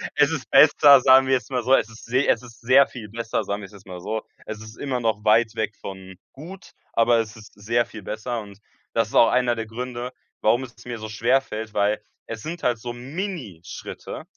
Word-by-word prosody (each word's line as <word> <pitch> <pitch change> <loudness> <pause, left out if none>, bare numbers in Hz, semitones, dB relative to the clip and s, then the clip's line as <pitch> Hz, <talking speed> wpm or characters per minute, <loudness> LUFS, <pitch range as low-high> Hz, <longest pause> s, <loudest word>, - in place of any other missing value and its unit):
es - - +4
ist - - -4
besser, 140 -3 +7
sagen 130 0 +6
wir 135 - +2
jetzt 125 -1 -1
mal 125 -2 -1
so, 130 +3 +5
es 115 - 0
ist 110 - -13
se 130 +4 +1
es 115 - +3
ist 120 -3 -15
sehr 130 +3 +5
viel 110 -5 -9
besser, 115 +1 -2
sagen 100 +1 -3
wir's 100 +1 -11
jetzt 100 -1 -15
mal 90 -2 -8
so. 110 +4 -4 0.2
Es 110 0 -7
ist 110 +1 -11
immer 130 -3 -2
noch 110 -2 -1
weit 110 +1 +4
weg 110 -1 -2
von 95 -1 -9 0.2
gut, 175 +7 -11 0.2
aber 115 0 +4
es 110 -1 -3
ist 110 -1 -14
sehr 115 +4 0
viel 105 - -10
besser. 110 +4 -4
Und 100 -1 -13 0.3
das 115 -1 +1
ist - - -14
auch 115 - +7
einer 125 -1 +2
der 115 -1 -4
Gründe, 125 +2 -5 0.3
warum 120 +4 +3
es 125 -1 -12
mir 120 -2 -5
so 110 0 -7
schwerfällt, 110 -1 0
weil, 105 +1 +1 0.3
es 115 -1 -6
sind 170 +2 -6
halt 120 -2 +2
so 120 +2 -6
Minischritte 130 - -7
115 Hz, 220 wpm, -23 LUFS, 105-125 Hz, 0.3 s, besser